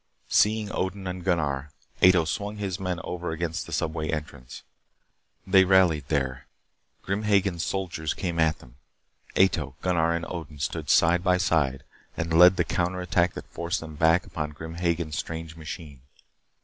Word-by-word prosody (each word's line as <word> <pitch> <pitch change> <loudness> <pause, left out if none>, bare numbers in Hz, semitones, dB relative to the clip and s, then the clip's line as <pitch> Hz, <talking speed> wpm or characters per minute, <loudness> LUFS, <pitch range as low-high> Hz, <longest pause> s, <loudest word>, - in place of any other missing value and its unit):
Seeing 105 0 +3
Odin 95 +1 -3
and 90 -1 -5
Gunnar, 75 -6 0 0.3
Ato 90 -3 +6
swung 100 +6 -3
his 95 -3 -3
men 90 -2 -2
over 90 0 -4
against 80 0 -3
the - - -10
subway 80 -1 -2
entrance. 75 -5 -6 0.8
They 95 0 +6
rallied 90 -7 +3
there. 65 -4 -2 0.6
Grim 100 +2 -2
Hagen's 100 -4 +1
soldiers 85 -5 -3
came 85 -3 -3
at 80 -1 +3
them. 60 +1 -18 0.6
Ato, 95 -2 +2
Gunnar, 85 -2 +2
and 85 0 -2
Odin 80 -4 -7
stood 70 - -3
side 85 +1 +4
by 90 -1 +3
side 75 -7 +1 0.3
and 80 0 -2
led 90 +1 +8
the - - +3
counter 90 +1 -1
attack 90 -1 +1
that - - -7
forced 85 +2 -2
them 80 -1 -9
back 80 +3 +3
upon 75 -2 -5
Grim 80 +2 -8
Hagen's 85 -3 -1
strange 80 0 -6
machine. 80 -4 -8
85 Hz, 160 wpm, -26 LUFS, 80-90 Hz, 0.8 s, led